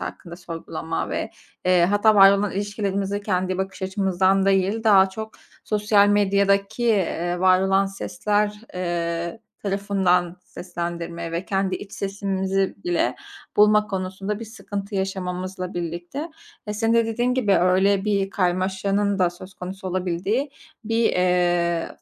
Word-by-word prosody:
hakkında 170 -1 -7
sorgulama 170 -2 -5
ve, - - -3 0.3
eee, 180 -1 +4
hatta 205 +2 +4
var 195 -1 +9
olan 200 0 0
ilişkilerimize 200 0 -2
kendi 185 -2 -1
bakış 190 0 -4
açımızdan 190 0 +1
değil, 195 +3 +1
daha 195 -3 +6
çok 220 +3 -7 0.3
sosyal 210 -1 +3
medyadaki, 200 +2 +2
iii, 175 -5 0
var 185 0 +5
olan 195 +1 +2
sesler, 205 - -1
eee, 170 +1 -2 0.2
tarafından 190 -3 +1
seslendirmeye 170 -1 -5
ve 170 +2 -2
kendi 195 -1 0
iç 200 - -11
sesimizi 195 -1 -1
bile 175 -1 0 0.4
bulma 210 0 +5
konusunda 195 +1 -4
bir - - -5
sıkıntı 205 -2 -7
yaşamamızla 185 -1 -3
birlikte, 175 - -4 0.4
e, 210 - -3
senin 225 +2 +1
de, 230 -1 +3
dediğin 240 +3 0
gibi, 210 -7 +2
öyle 190 +2 +3
bir 200 -2 0
karmaşanın 195 +2 0
da 180 -2 +3
söz 185 +2 -12
konusu 185 +1 -7
olabildiği 185 - -1 0.3
bir, 225 +1 +2
iii, 175 -2 +1
195 Hz, 130 wpm, -23 LUFS, 180-205 Hz, 0.4 s, var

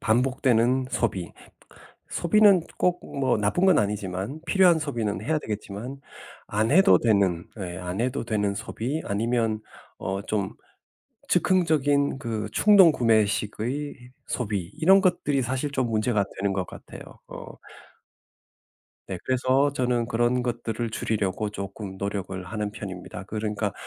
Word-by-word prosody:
반복되는 125 +1 +2
소비. 95 -9 -2 0.8
소비는 200 0 +4 0.2
꼭 180 0 +1 0.2
뭐 130 -4 +2
나쁜 105 - +1
건 190 -4 +5
아니지만 100 +5 -3
필요한 175 -1 +4
소비는 120 -9 -2
해야 155 0 0
되겠지만 110 +4 -6 0.5
안 110 +3 0
해도 190 +5 +6
되는 100 -6 +2
예 90 -3 -5
안 90 +3 -4
해도 130 +2 -1
되는 105 -3 0
소비 135 +11 -4
아니면 110 +1 0 0.4
어 95 +1 -3
좀 100 -3 -2 0.8
즉흥적인 145 -6 +2
그 110 -4 -3
충동 195 - +6
구매식의 120 +3 0
소비 100 -8 -3
이런 190 +4 +6
것들이 175 -8 +1
사실 130 +4 -2
좀 130 -3 0
문제가 110 -2 +1
되는 100 0 0
것 95 -1 -1
같아요. - - -11 0.3
어. - - -9 1.6
네 95 - -5
그래서 130 +2 +2
저는 125 -3 0
그런 120 +1 +1
것들을 120 -1 -3
줄이려고 105 -2 -2
쪼금 100 -1 -7
노력을 95 -2 -4
하는 105 +3 -4
편입니다. 95 -2 -8
그러니까 105 0 -3
115 Hz, 275 characters per minute, -25 LUFS, 100-140 Hz, 1.6 s, 해도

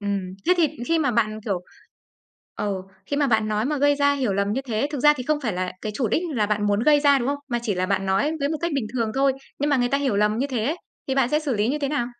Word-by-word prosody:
Ừm, 195 -2 -3
thế 360 - +5
thì 325 -4 +3 0.2
khi 330 0 +3
mà 285 -5 +2
bạn, 215 -2 0
kiểu 195 -5 -1 1.0
Ừ. 195 -3 -2 0.2
Khi 285 - -2
mà 285 -1 +2
bạn 220 -3 +2
nói 215 +1 0
mà 295 +1 -1
gây 285 +1 +4
ra 285 0 +3
hiểu 255 -8 0
lầm 200 +1 0
như 255 - -1
thế 230 +2 0
thực 290 - -3
ra 295 +3 +7
thì 250 - -4
không 300 +2 0
phải 225 - -1
là 180 0 -3
cái 215 - -3
chủ 240 -1 0
đích 305 - +1
là 210 -3 +1
bạn 210 0 0
muốn 205 0 +2
gây 295 +1 +5
ra, 285 -1 +5
đúng 245 +2 -2
không? 285 - -1
Mà 240 - 0
chỉ 215 -4 -1
là 185 0 -1
bạn 195 0 0
nói 195 +12 +1
với 280 - +1
một 315 - -1
cách 340 -1 -1
bình 265 -6 -1
thường 230 -3 -1
thôi. 270 0 +3 0.3
Nhưng 290 +1 0
mà 285 - +4
người 245 -1 +1
ta 280 +2 +1
hiểu 270 -7 0
lầm 210 +1 +2
như 275 - +1
thế 245 -5 -2
ấy, 310 +8 0 0.3
thì 265 - +1
bạn 265 -3 +2
sẽ 300 +2 +1
xử 285 -6 -1
lý 210 +3 +1
như 295 +3 0
thế 280 - -1
nào? 275 -4 -1
245 Hz, 310 wpm, -23 LUFS, 210-285 Hz, 1.0 s, ra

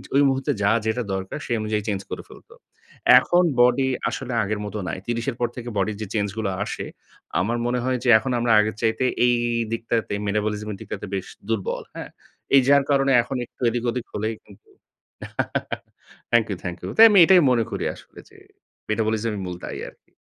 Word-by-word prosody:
ওই 140 - +6
মুহূর্তে 135 0 0
যা 100 - +3
যেটা 115 +2 0
দরকার 95 +7 -4
সেই 120 - -1
অনুযায়ী 105 0 -1
চেঞ্জ 100 -2 -1
করে - - -6
ফেলত। - - -16 0.7
এখন 175 +1 +2 0.2
বডি 125 +2 +4 0.2
আসলে 130 -2 -5
আগের 105 +1 -2
মত 105 - -7
নাই। - - -3
৩০ 120 +1 -3
এর - - -10
পর 120 - +1
থেকে 120 -1 -6
বডির 100 +1 -1
যে 105 - -4
চেঞ্জগুলো 105 0 -1
আসে, - - -5 0.5
আমার 115 +6 0
মনে 125 +1 0
হয় 130 0 0
যে 125 - +1
এখন 125 +4 -3
আমরা 120 0 +1
আগের 110 +1 0
চাইতে 115 +3 +1 0.2
এই 120 0 +4 0.4
দিকটাতে, 115 -1 -2
মেটাবলিজম 105 +1 -1
এর 100 - -6
দিকটাতে - - -6
বেশ 95 -2 -3 0.2
দুর্বল। 110 -4 -2
হ্যাঁ? - - -7 0.5
এই 135 - +8
যার 140 0 +5
কারণে 135 0 +3
এখন 135 +2 -4
একটু - - -31
এদিক 120 +1 -3
ওদিক 120 0 -3
হলেই 110 +2 -2
কিন্তু 100 +1 -19 1.6
থ্যাংক 120 -2 +4
ইউ, 100 - -2
থ্যাংক 90 -1 -4
ইউ। - - -5
তাই 225 - +10
আমি 200 - +6
এটাই 185 0 +6
মনে 120 -2 +3
করি - - -3
আসলে - - -16
যে - - -19 0.5
মেটাবলিজমই 110 0 -1
মূল 90 -1 -5
দায়ি - - -6
আরকি। - - -26
115 Hz, 190 wpm, -23 LUFS, 105-125 Hz, 1.6 s, তাই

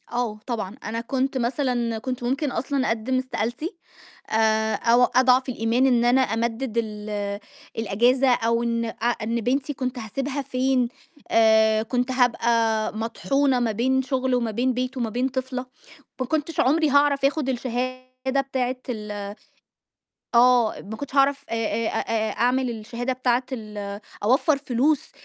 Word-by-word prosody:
آه، 240 -3 -2
طبعًا. 225 -5 -3
أنا 230 +1 -3
كنت 265 +2 -1
مثلًا 240 -2 0
كنت 255 +1 -4
ممكن 270 +4 -1
أصلًا 270 0 -1
أقدّم 230 +3 0
استقالتي، 260 - -3 0.5
آآ 220 0 +2
أو 235 +2 +4
أضعف 255 +1 +4
الإيمان 235 +1 +1
إن 240 -3 +3
أنا 250 +2 +4
أمدد 230 +1 -1
ال 210 -2 -3 0.4
الإجازة، 240 +5 +2
أو 230 0 +1
إن 230 0 0
أ 225 - -3 0.3
إن 230 +2 -1
بنتي 270 +5 0
كنت 255 -2 -3
هاسبيها 270 +6 -3
فين؟ 255 -1 +1 0.4
آآ 220 -1 +4
كنت 245 +2 -1
هابقى 230 -3 +2
مطحونة 265 +4 +1
ما 235 -2 +1
بين 260 +5 +1
شُغل 260 -1 0
وما 235 -2 0
بين 250 +4 0
بِيِت 255 +1 -3
وما 235 -3 -1
بين 245 +4 0
طفلة، 260 -1 -4 0.5
ما 255 - 0
كنتش 310 +2 -2
عمري 305 +4 +3
هاعرف 285 0 +3
آخُد 280 -1 +1
الشهادة 255 +1 -2
بتاعة 260 -2 -2
ال 215 -3 -4 1.2
آه، 240 -1 +5
ما 220 +3 -8
كنتش 280 +2 -7
هاعرف 280 0 +3
آآ - - -1
آآ 225 0 -1
أ - - -2 0.2
آآ - - -3
أعمل 250 +2 +1
الشهادة 235 +3 -4
بتاعة 255 -1 +1
ال 210 -4 -6 0.2
أوفّر 265 +7 +3
فلوس 275 +2 0
245 Hz, 145 wpm, -24 LUFS, 225-265 Hz, 1.2 s, آه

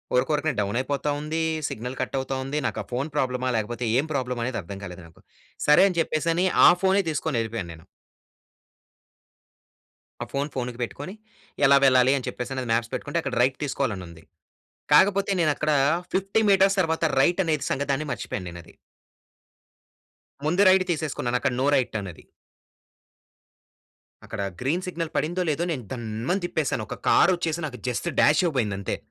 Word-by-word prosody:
ఉరుకురకనే 150 +3 +1
down 100 +3 -1
అయిపోతా 140 +3 -2
ఉంది. 155 +2 -2 0.3
Signal 125 +4 -6
cut - - -3
అవుతా 135 0 -3
ఉంది. 135 +3 -3
నాకు - - -2
ఆ - - -21
ఫోన్ 135 +5 -2
ప్రాబ్లమా 130 -2 0
లేకపోతే 120 +3 -3
ఏం 150 - 0
ప్రాబ్లమ్ 125 -3 -2
అనేది 120 -2 -2
అర్థం 95 +4 -8
కాలేదు 90 -2 -8
నాకు. 80 - -21 0.5
సరే 150 +5 +7
అని 180 - -5
చెప్పేసని 165 +3 +1 0.2
ఆ - - +10
ఫోనే 195 +1 +3
తీసుకొని 150 -3 -2
వెళ్ళిపోయాను 115 -5 -4
నేను... 80 0 -16 2.4
ఆ - - -6
ఫోన్ 140 +1 -1
ఫోన్‌కి 125 -1 -4
పెట్టుకొని 145 +8 -5 0.5
ఎలా 140 - +7
వెళ్ళాలి 130 -1 +5
అని 130 - -5
చెప్పేసి 125 +2 -4
అది 125 - -5
మాప్స్ 115 0 -1
పెట్టుకుంటే 145 +4 -2
అక్కడ 135 -4 -4
రైట్ 130 +1 +2
తీసుకోవాలి 135 -4 -1
అని 90 - -8
ఉంది. 85 -1 -14 0.7
కాకపోతే 195 +6 +4
నేను 155 -2 +3
అక్కడ 155 0 0 0.4
ఫిఫ్టీ 195 +3 +1
మీటర్స్ 195 +1 +4
తర్వాత 160 -2 0 0.2
రైట్ 175 +7 +3
అనేది 155 -3 0
సంగతాన్ని 140 +2 -1
మర్చిపోయాను 95 -8 -4
నేను 85 0 -9
అది. - - -17 1.7
ముందే 175 +6 +3
రైట్ 190 0 +5
తీసేసుకున్నాను. 145 -6 -1
అక్కడ 135 - 0
నో 135 - +2
రైట్ 125 -3 0
అన్నది. 95 -5 -9 2.0
అక్కడ - - -5 0.2
గ్రీన్ 160 +8 -1
సిగ్నల్ 165 -3 -4
పడిందో, 175 +4 0
లేదో, 155 +3 0
నేను 130 -6 -3
దన్మని 120 - -3
తిప్పేసాను. 150 -9 -1
ఒక - - -5
కారు 180 - +5
వచ్చేసి 170 -1 -2
నాకు 125 -4 -9
జస్ట్ 125 +7 -2
డ్యాష్ 150 +1 +5
ఇవ్వబోయింది 115 - 0
అంతే. 100 - -3
135 Hz, 160 wpm, -25 LUFS, 120-160 Hz, 2.4 s, ఆ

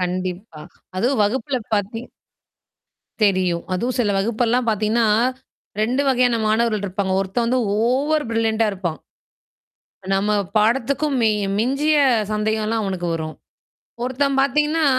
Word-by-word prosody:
கண்டிப்பா. 180 -1 -4 0.4
அதுவும் 240 +4 +1
வகுப்பில 255 +5 0 0.2
பார்த்தீங் 225 +4 -3 1.2
தெரியும். 185 -4 +1
அதுவும் 245 +8 -1
சில 215 -4 +2
வகுப்பெல்லாம் 235 +3 0
பார்த்தீங்கன்னா 220 +2 +1 0.7
2 250 +5 +1
வகையான 245 -3 +3
மாணவர்கள் 215 -1 +1
இருப்பாங்க. 190 0 -2
ஒருத்தன் 200 +5 -1
வந்து 250 +2 +1 0.2
ஓவர் 280 +7 +1
பரில்லண்டா 225 -1 +1
இருப்பான். 185 -5 -4 1.1
நம்ம 200 +2 +1 0.3
பாடத்துக்கும் 270 +6 +1
மி 225 - +4 0.3
மிஞ்சிய 275 +7 +2 0.4
சந்தேகம்லாம் 215 +1 -1
அவனுக்கு 185 -3 -3
வரும். 155 -1 -4 0.7
ஒருத்தன் 270 +2 0
பார்த்தீங்கன்னா, 300 +3 +1
225 Hz, 110 wpm, -21 LUFS, 200-255 Hz, 1.2 s, மி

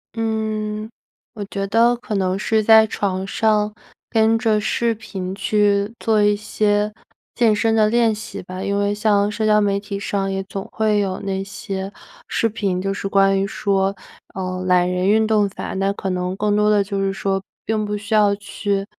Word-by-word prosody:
嗯， 215 -1 -2 0.5
我 210 - -6
觉 195 0 -4
得 230 +4 +3
可 235 -2 -7
能 190 -1 0
是 220 +2 +1
在 220 0 +7
床 190 -3 -2
上， 210 0 +1 0.4
跟 225 0 +3
着 220 -2 +1
视 230 +2 0
频 190 -4 -6
去 205 +1 +1
做 220 -2 +2
一 205 0 +4
些 210 0 0 0.4
健 225 -3 +3
身 225 +2 +1
的 215 -1 +4
练 230 -1 +3
习 215 +1 -7
吧。 185 +1 -7
因 200 0 -1
为 205 0 +1
像 205 -1 +2
社 215 +1 -3
交 210 0 +5
媒 200 -1 +1
体 200 -1 -6
上 195 -1 -2
也 195 0 -2
总 195 0 -7
会 215 -1 +1
有 190 -2 -1
那 195 -1 -2
些 195 0 -6 0.4
视 230 - +1
频， 200 -5 -2
就 195 +1 -1
是 200 - -4
关 195 0 +3
于 195 - 0
说， 195 -1 0 0.4
呃， 185 -1 -3
懒 180 -1 +4
人 180 +1 0
运 220 +1 +4
动 210 -2 +2
法， - - -6
那 195 +1 0
可 190 -2 -4
能 180 0 -2
更 210 0 +1
多 210 0 +3
的 205 -1 +3
就 200 0 -3
是 195 0 0
说 195 0 -1 0.2
并 215 -1 0
不 210 0 -2
需 210 +2 -5
要 205 -2 +4
去， 200 -1 -3
205 Hz, 205 characters per minute, -20 LUFS, 195-215 Hz, 0.5 s, 在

